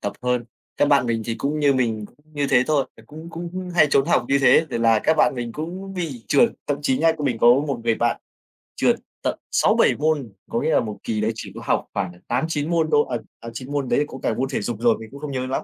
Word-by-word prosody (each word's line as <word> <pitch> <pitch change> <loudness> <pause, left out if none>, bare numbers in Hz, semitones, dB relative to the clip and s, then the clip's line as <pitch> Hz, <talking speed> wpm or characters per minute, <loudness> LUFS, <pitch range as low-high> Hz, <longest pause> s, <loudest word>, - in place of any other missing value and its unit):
tập 100 - -3
hơn. 125 -1 0 0.3
Các 145 - +3
bạn 140 -4 +4
mình 115 -1 -1
thì 115 - -2
cũng 145 +5 -2
như 145 -2 +4
mình 115 -4 0
cũng - - -26 0.2
như 145 -1 -1
thế 125 -2 +5
thôi, 145 -3 +2
là 115 - -17
cũng 160 +3 -10
cũng 175 +2 -6
hay 175 - +6
trốn 135 - +3
học - - +2
như 140 0 +3
thế 135 +4 +5
thì - - -2
là 115 -1 +4
các 160 +8 +1
bạn 150 - +3
mình 120 -2 -4
cũng 185 +7 -6
bị 150 -11 -5
trượt. 235 - +5 0.2
Thậm 145 -1 -1
chí 130 -3 +1
nhá, 165 0 +4
mình 130 -6 -1
có - - +3 0.2
một 135 -5 -3
người 115 -1 +3
bạn 120 +1 0 0.6
trượt - - +3 0.3
tận - - -1
6-7 - - +3
môn. 145 -7 0 0.2
Có 235 0 -1
nghĩa 160 - +1
là - - +5
một 105 -2 -4
kỳ 110 -2 -2
đấy 110 +1 +1
chỉ - - -7
có - - -7
học - - 0
khoảng 90 - -2 0.2
8-9 150 +4 -1
môn 165 -2 +2
thôi 150 -1 +4
à, 120 - -1 0.2
à 115 - -8
9 130 +4 -7
môn 140 -3 -1
đấy - - +3
thì 150 - +1
có 130 - -9
cả - - +1
môn 130 +4 -2
thể 135 - -2
dục 120 - -3
rồi, 115 -1 +3
mình 110 -1 -10
cũng 140 - -10
không 150 -1 -5
nhớ 130 -1 -2
lắm. 130 - -2
135 Hz, 275 wpm, -22 LUFS, 120-155 Hz, 0.6 s, hay